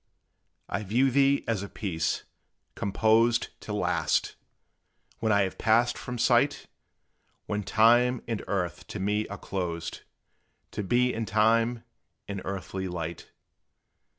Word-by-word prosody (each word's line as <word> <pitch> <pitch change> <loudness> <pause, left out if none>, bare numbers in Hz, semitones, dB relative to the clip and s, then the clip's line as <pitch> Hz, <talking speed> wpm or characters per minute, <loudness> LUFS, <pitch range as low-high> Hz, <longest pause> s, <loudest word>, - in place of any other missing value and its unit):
I 105 - -2
view 120 +7 +2
thee 140 +1 +3
as 110 -4 0
a 100 - -6
piece, 80 -6 -2 0.5
composed 110 +3 +2
To - - -7
last, - - 0 0.9
when 110 -1 +1
I 100 -1 +4
have 95 - -4
passed 115 +2 +3
from 125 0 -6
sight - - +2 0.8
When 105 0 -2
time 120 +4 +4
and 115 -3 -3
earth 90 -3 -2
to 105 - -6
me 105 +2 0
are - - -7
closed, 85 -3 -4 0.7
To 105 - -3
be 125 +5 +2
in 115 -1 -3
time 115 +2 +2 0.4
and 100 -1 -4
earthly 95 0 -4
light. 85 -2 -5
110 Hz, 125 wpm, -28 LUFS, 95-115 Hz, 0.9 s, I